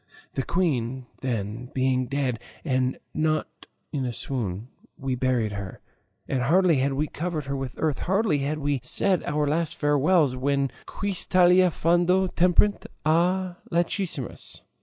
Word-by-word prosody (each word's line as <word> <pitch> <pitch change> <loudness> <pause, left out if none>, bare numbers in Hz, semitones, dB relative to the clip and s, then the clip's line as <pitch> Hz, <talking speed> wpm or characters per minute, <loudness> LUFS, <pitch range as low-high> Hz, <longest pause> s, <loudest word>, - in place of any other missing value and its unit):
The - - -1
queen, 130 -7 -1
then, 115 -1 -3
being 130 -1 +1
dead, 130 -4 -1 0.3
and 130 -3 +1 0.2
not 155 0 -1 0.3
in 140 -3 -1
a 125 - -1
swoon, 115 -4 -3 0.3
we 135 -1 -2
buried 125 -4 +1
her; 100 -2 -6 0.5
and 130 -2 0
hardly 170 +4 +4
had 135 +1 +1
we 145 +3 0
covered 155 -1 -4
her 140 0 -3
with 135 -2 -4
earth, 155 -4 0
hardly 195 -4 +1
had 145 +3 -1
we 145 -2 0
said 185 - +1
our 150 0 0
last 155 +2 0
farewells, 145 -1 +3
when, 140 +1 0 0.2
quis 200 -3 -2
talia 180 0 +5
fando 175 +3 +2
temperet 180 +4 +3 0.2
a 175 +3 +2
lachrymis? 170 - -2
145 Hz, 140 wpm, -26 LUFS, 130-175 Hz, 0.5 s, talia